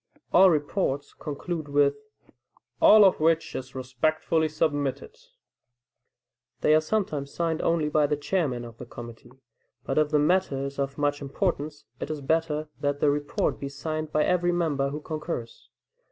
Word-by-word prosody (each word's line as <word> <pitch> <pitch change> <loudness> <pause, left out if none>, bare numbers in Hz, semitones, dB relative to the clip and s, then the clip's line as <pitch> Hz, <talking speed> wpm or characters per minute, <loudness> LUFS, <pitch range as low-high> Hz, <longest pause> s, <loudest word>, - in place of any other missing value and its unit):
All 190 +1 +8
reports 145 -2 -1
conclude 155 +2 -5
with, 145 0 +3 0.9
"All 215 -1 +8
of 190 - +4
which 165 +1 +1
is 130 +1 -6
respectfully 155 +5 0
submitted." 150 - -1 1.5
They 150 - +4
are 155 - +5
sometimes 155 -6 -2
signed 165 -2 -1
only 165 -2 +1
by 150 0 +2
the 150 0 0
chairman 145 -5 -1
of 115 -1 -12
the 125 - -8
committee, 120 0 -11 0.5
but 135 - 0
if 155 -1 +2
the 150 - +2
matter 150 -3 +1
is 140 0 -6
of 140 0 -2
much 145 0 0
importance, 150 0 -2
it - - -5
is 155 -1 -3
better 155 +1 0
that 145 0 -1
the 145 - +3
report 145 0 -1
be 140 - -4
signed 155 +2 -4
by 150 - +2
every 175 0 +2
member 155 -6 0
who 150 +2 -5
concurs. 155 -7 -6
150 Hz, 155 wpm, -26 LUFS, 140-160 Hz, 1.5 s, All